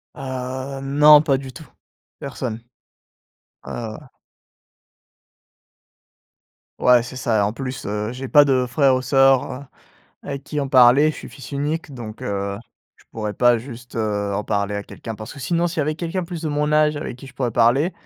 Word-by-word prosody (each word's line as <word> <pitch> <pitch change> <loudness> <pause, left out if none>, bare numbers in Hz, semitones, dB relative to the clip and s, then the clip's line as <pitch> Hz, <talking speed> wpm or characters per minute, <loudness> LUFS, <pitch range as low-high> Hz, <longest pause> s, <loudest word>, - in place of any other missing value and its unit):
Heu, 130 +1 -5
non, 150 +2 +6
pas 140 -4 +1
du 135 -1 -8
tout. 160 -4 -12 0.5
Personne. 125 -4 -5 1.0
Ouais, - - -7
voilà. 120 +4 -7 2.7
Ouais, 125 -1 +5
c'est 130 +2 -8
ça 115 -3 +1
et - - +3
en 100 +1 +1
plus, 130 +1 -6
heu, 105 +3 -3
j'ai 130 +1 -6
pas 145 -1 +7
de 130 -2 +2
frère 130 +1 +3
ou 130 - -1
sœur, 135 0 +3
heu, 140 +2 -8 0.6
avec 140 0 -6
qui 150 -1 -3
en 140 - -2
parler. 130 +3 +6
Je - - -9
suis - - -9
fils 130 -3 -11
unique, 145 +2 -3
donc 115 -4 -8
heu, 100 0 -3 0.4
je - - -24
pourrais 105 -2 -4
pas 120 +1 +4
juste, 120 0 -10
heu, 105 -2 -1
en 105 +1 -2
parler 100 0 -1
à 100 - -5
quelqu'un 115 -2 -8
parce 110 +2 -8
que 140 - -11
sinon, 170 +5 0
s'il 165 -1 -4
y - - +3
avait 155 +1 -1
quelqu'un 175 +2 -3
plus 170 -1 -7
de 155 - -2
mon 150 0 0
âge 150 0 +3
avec 145 -4 -5
qui 135 - -12
je 130 - -14
pourrais 125 -3 -1
parler, 120 - +3
130 Hz, 190 wpm, -21 LUFS, 115-145 Hz, 2.7 s, pas